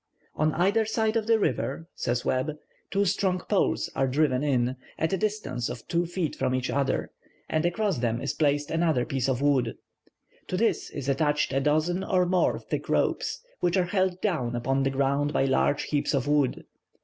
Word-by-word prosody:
"On 155 +1 +1
either 200 +6 +3
side 220 0 0
of 225 -1 0
the 225 -1 +5
river," 165 -5 -1
says 120 0 -2
Webb, 140 +4 0 0.3
"two 200 +1 +1
strong 190 0 +1
poles 200 +1 +1
are 135 - +2
driven 130 -1 +2
in, 130 -3 +1 0.2
at 160 +4 0
a - - +2
distance 210 - -2
of - - -8
two 170 0 0
feet 175 -2 -2
from 130 - 0
each 130 -1 -1
other, 140 +1 0 0.4
and 155 +2 +1
across 195 - 0
them 120 -1 0
is 135 +3 -2
placed 145 -1 +1
another 160 -6 +2
piece 135 -1 -1
of 130 +1 0
wood. 140 -3 +2 0.7
To 185 - -2
this 230 +3 +1
is 140 -2 -6
attached 145 0 +1
a 135 - +2
dozen 155 +6 +1
or 185 -2 +2
more 180 0 +2
thick - - -5
ropes, - - 0 0.2
which 175 +1 +1
are 180 - +3
held 185 -2 +1
down 130 - -1
upon 135 +3 0
the 135 - +2
ground 140 +2 0
by 135 - +2
large 135 +1 +2
heaps 145 0 0
of 135 0 -1
wood. 145 -3 +1
150 Hz, 190 wpm, -27 LUFS, 135-185 Hz, 0.7 s, the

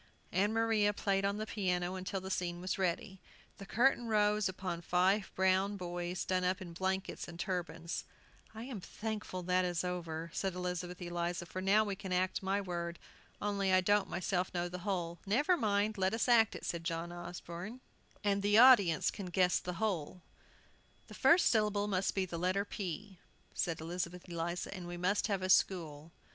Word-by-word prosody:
Ann 205 +3 +2
Maria 220 -2 +2
played 195 -1 0
on 200 +1 0
the 215 - -3
piano 185 -3 -1
till 190 +1 -3
the 190 +1 -6
scene 175 -2 -2
was 185 +2 -3
ready. 190 +2 -1 0.4
The 195 - -9
curtain 240 +2 +3
rose 210 -1 +2
upon 185 -2 -4
five 185 +4 +2
brown 190 +2 +2
boys 175 -1 -3
done 185 -1 0
up 185 +2 +1
in 175 -3 -8
blankets 190 +2 -2
and 170 0 -10
turbans. 170 -2 -3 0.5
"I 220 - -6
am 240 -6 -6
thankful 210 -3 -5
that 185 +1 +2
is 175 -1 -1
over," 170 -2 -4
said 190 -2 -2
Elizabeth 180 0 -4
Eliza, 175 0 -2
"for 185 +2 -5
now 200 +3 +4
we 200 -2 -3
can 190 0 -7
act 180 +1 +1
my 195 +1 0
word. 170 -3 -4 0.4
Only 200 -2 0
I 185 - +6
don't 205 +2 +2
myself 180 0 -1
know 175 0 0
the 180 +1 -6
whole." 175 -3 -2
"Never 290 - +3
mind, 210 - +1
let 190 +3 +2
us 230 - 0
act 230 -3 +5
it," - - -7
said 170 -1 -3
John 165 +1 -3
Osborne, 175 +5 -7 0.4
"and 200 -1 +2
the 205 +1 +4
audience 230 -9 +7
can 195 -3 -6
guess 180 0 +3
the 180 - -5
whole." 180 -3 -2 0.9
"The - - -10
first 345 +1 +5
syllable 210 -2 +2
must 195 -1 0
be 190 -1 +1
the 170 -2 -5
letter 185 +3 +1
P," 190 -1 -6 0.3
said 165 -2 -1
Elizabeth 175 +2 -4
Eliza, 170 +1 -3
"and 180 -3 -7
we 175 0 -5
must 185 +4 +1
have 195 -3 -1
a - - 0
school." 165 -5 +2
185 Hz, 180 wpm, -34 LUFS, 175-205 Hz, 0.9 s, audience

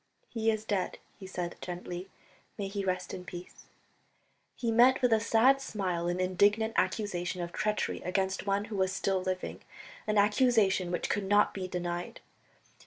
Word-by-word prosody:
"He 225 -1 0
is 215 -1 -1
dead," 200 -4 -1 0.2
he 190 - -8
said 180 -2 -4
gently, 180 +1 -6 0.5
"may 200 - -3
he 200 0 -3
rest 185 -1 -2
in 185 - -6
peace." 180 0 -10 0.9
He 235 -2 -1
met 245 +3 +6
with 245 -2 +5
a 220 - +4
sad 230 +5 +4
smile 185 -8 -2
an 175 +1 -1
indignant 205 +5 +2
accusation 185 -2 -1
of 175 0 -4
treachery 210 +4 -1
against 190 +2 -1
one 200 +1 +1
who 210 -2 -5
was 190 -1 +2
still 190 0 0
living, 185 0 -3 0.5
an 215 0 +1
accusation 205 -3 +3
which 175 - -1
could 205 -1 -1
not 205 +1 +4
be 190 -2 -4
denied. 175 -1 -4
195 Hz, 165 wpm, -30 LUFS, 180-215 Hz, 0.9 s, met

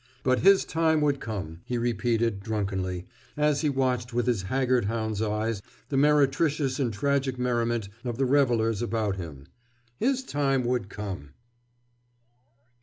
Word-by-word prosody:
But 130 0 +3
his 195 +1 +5
time 160 -1 +2
would 145 -2 +2
come, 90 -7 -5
he 125 - -3
repeated 115 -2 0
drunkenly, 95 -4 -2 0.3
as 150 -1 +2
he 155 - +2
watched 125 -3 -1
with 120 - +1
his 120 -5 +1
haggard 125 +3 +1
hound's 110 -1 -2
eyes 110 0 -1 0.3
the 140 - -2
meretricious 145 0 +2
and 125 -4 +1
tragic 135 +2 0
merriment 120 -3 0 0.2
of 120 -2 -3
the 135 - +2
revelers 120 -5 +2
about 110 -4 -1
him—his 120 - -5
time 135 - 0
would 120 -5 -1
come! 95 -10 -7
120 Hz, 135 wpm, -27 LUFS, 105-135 Hz, 0.3 s, his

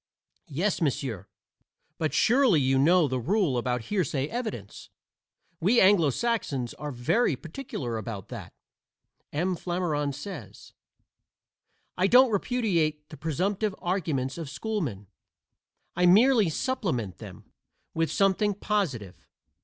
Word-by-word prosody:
Yes, 180 +8 -1
monsieur, 125 - -2 0.7
but 155 -1 0
surely 245 - +4
you 135 0 +2
know 165 +3 +4
the 130 -1 -2
rule 180 - +1
about 125 -1 -1
hearsay 150 - -1
evidence. 220 - -6 0.7
We 210 +9 +3
Anglo 190 -6 +5
Saxons 140 - -1
are 150 -1 -6
very 140 - +1
particular 135 - -5
about 110 -4 -7
that. - - -8 0.8
M. 180 +5 0
Flammarion 165 -5 -1
says: 185 +5 -9 1.3
"I 185 - +4
don't 250 +2 +6
repudiate 175 -10 0
the 155 - -10
presumptive 185 +7 -1
arguments 160 -7 -2
of 160 -4 -5
schoolmen. 150 - -3 0.9
I 180 +1 +3
merely 220 +1 +5
supplement 155 - -2
them - - -12 0.4
with 165 0 0
something 200 +1 +2
positive. 150 - -3
165 Hz, 115 wpm, -27 LUFS, 135-205 Hz, 1.3 s, don't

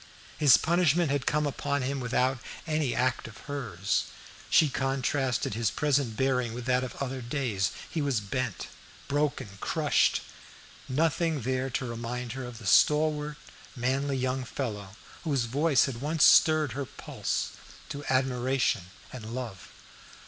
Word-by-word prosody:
His 140 -9 +7
punishment 170 - +2
had 140 -2 -1
come 150 0 +2
upon 140 0 -1
him 135 +2 -2
without 125 +1 +1 0.3
any 155 -5 0
act 130 -2 0
of 110 - -12
hers. 110 -10 -1 0.4
She 155 - +6
contrasted 135 -3 0
his 115 -1 +1
present 140 -6 0
bearing 125 -3 +1
with 125 -1 -6
that 125 0 +2
of 130 - -6
other 135 -1 -4
days. 120 -6 -1 0.2
He 160 - -3
was 140 -5 +1
bent, 115 +2 -3 0.4
broken, 145 -3 0
crushed. - - +2 0.7
Nothing 155 +2 +1
there 130 +2 -1
to 130 +1 -2
remind 120 +1 -4
her 130 +1 -5
of 125 -2 -8
the 115 - -11
stalwart, 150 +5 +3 0.4
manly 135 +2 0
young 130 0 -1
fellow 105 -6 -5 0.3
whose 140 -7 +1
voice 140 +3 +3
had 125 -3 -5
once 155 +2 +1
stirred 155 -3 +6
her 140 +4 -3
pulse - - -3 0.4
to 145 0 -6
admiration 130 -5 +1 0.3
and 115 -2 -7
love. 115 -7 -6
130 Hz, 140 wpm, -28 LUFS, 120-145 Hz, 0.7 s, His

